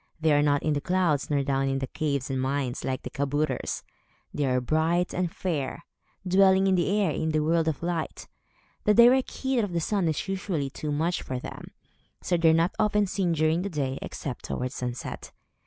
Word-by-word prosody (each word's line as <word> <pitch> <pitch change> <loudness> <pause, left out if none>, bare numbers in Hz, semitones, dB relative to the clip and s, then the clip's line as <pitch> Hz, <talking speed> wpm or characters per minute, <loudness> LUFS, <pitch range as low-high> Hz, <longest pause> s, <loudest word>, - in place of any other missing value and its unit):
They 160 -1 +3
are 145 - +4
not 145 -1 +2
in 155 - +1
the 145 - -1
clouds, 175 -5 +1
nor 140 -2 +1
down 135 0 0
in 135 - 0
the 135 - -2
caves 140 -1 -2
and 130 -1 -1
mines, 130 -1 -2
like 130 0 -3
the - - -6
kabouters. 140 0 -1 0.5
They 145 -2 0
are 125 -1 +2
bright 160 +7 +1
and 180 -2 -1
fair, 155 -9 -3 0.4
dwelling 190 +1 +5
in 190 - +3
the 180 -1 +2
air, 195 -6 +2
and - - -3
in 160 - 0
the 155 -1 +1
world 165 +1 +2
of 160 0 -2
light. 170 -2 -3 0.6
The 210 - +4
direct 245 +3 +6
heat 265 -2 -1
of 205 -5 -1
the 170 - +1
sun 190 +1 0
is 160 +4 -1
usually 185 -7 -2
too 150 +2 -4
much 165 +4 0
for 130 - -4
them, 125 - -8 0.5
so 180 - 0
they 165 -1 +4
are - - +5
not 165 +3 +2
often 210 -1 +3
seen 185 -2 0
during 160 +2 +2
the 200 - -3
day, 140 -5 -2
except 135 -4 -6
towards 125 +1 -3
sunset. 125 -1 -5
160 Hz, 210 wpm, -27 LUFS, 140-180 Hz, 0.6 s, direct